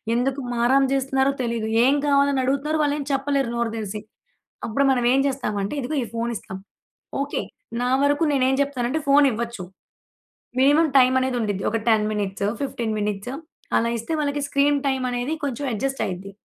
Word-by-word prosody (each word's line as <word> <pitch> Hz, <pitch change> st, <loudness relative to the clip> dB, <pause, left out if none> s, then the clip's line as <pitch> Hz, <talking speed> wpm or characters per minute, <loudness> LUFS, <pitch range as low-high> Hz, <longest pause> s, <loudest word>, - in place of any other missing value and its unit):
ఎందుకు 265 Hz, +3 st, 0 dB
మారాం 245 Hz, +3 st, +3 dB
జేస్తున్నారో 270 Hz, 0 st, +1 dB
తెలీదు, 230 Hz, -2 st, -2 dB, 0.2 s
ఏం 270 Hz, +3 st, +4 dB
కావాలి 280 Hz, 0 st, +3 dB
అని 265 Hz, -, +1 dB
అడుగుతున్నారు 280 Hz, +4 st, 0 dB
వాళ్ళేమొ 290 Hz, -1 st, -1 dB
చెప్పలేరు 275 Hz, -2 st, 0 dB
నోరు 235 Hz, -1 st, -1 dB
దెరిసి. 210 Hz, -1 st, -5 dB, 0.6 s
అప్పుడు 235 Hz, +5 st, 0 dB
మనం 245 Hz, -2 st, +1 dB
ఏం 270 Hz, -, +3 dB
జేస్తామంటే 210 Hz, -7 st, -2 dB
ఇదిగో 275 Hz, +5 st, -3 dB
ఈ -, -, -4 dB
ఫోన్ 230 Hz, +1 st, -2 dB
ఇస్తాం. 190 Hz, -2 st, -7 dB, 0.6 s
ఓకే. 280 Hz, +1 st, -2 dB, 0.4 s
నా 250 Hz, -, 0 dB
వరకు 290 Hz, +3 st, +2 dB
నేనేం 265 Hz, -1 st, +2 dB
జేప్తానంటే 280 Hz, +1 st, -1 dB
ఫోన్ 285 Hz, +1 st, +6 dB
ఇవ్వచ్చు. 230 Hz, -3 st, -4 dB, 1.0 s
మినిమమ్ 295 Hz, +4 st, +4 dB
టైమ్ 255 Hz, 0 st, +5 dB
అనేది 260 Hz, -1 st, -1 dB
ఉండిద్ది. 205 Hz, -3 st, -2 dB
ఒక 225 Hz, -, +1 dB
10 215 Hz, -2 st, +3 dB
మినిట్సో, 200 Hz, -1 st, -2 dB
15 235 Hz, -5 st, -2 dB
మినిట్స్ 210 Hz, +3 st, -3 dB, 0.4 s
అలా 230 Hz, -, +1 dB
ఇస్తే 230 Hz, +8 st, -4 dB
వాళ్ళకి 290 Hz, 0 st, -1 dB
స్క్రీన్ 285 Hz, +1 st, +2 dB
టైమ్ 265 Hz, -1 st, 0 dB
అనేది 245 Hz, +5 st, -2 dB
కొంచెం 280 Hz, 0 st, -2 dB
అడ్జస్ట్ 270 Hz, +5 st, -2 dB
అయిద్ది. 190 Hz, +2 st, -6 dB
260 Hz, 165 wpm, -23 LUFS, 230-280 Hz, 1.0 s, ఫోన్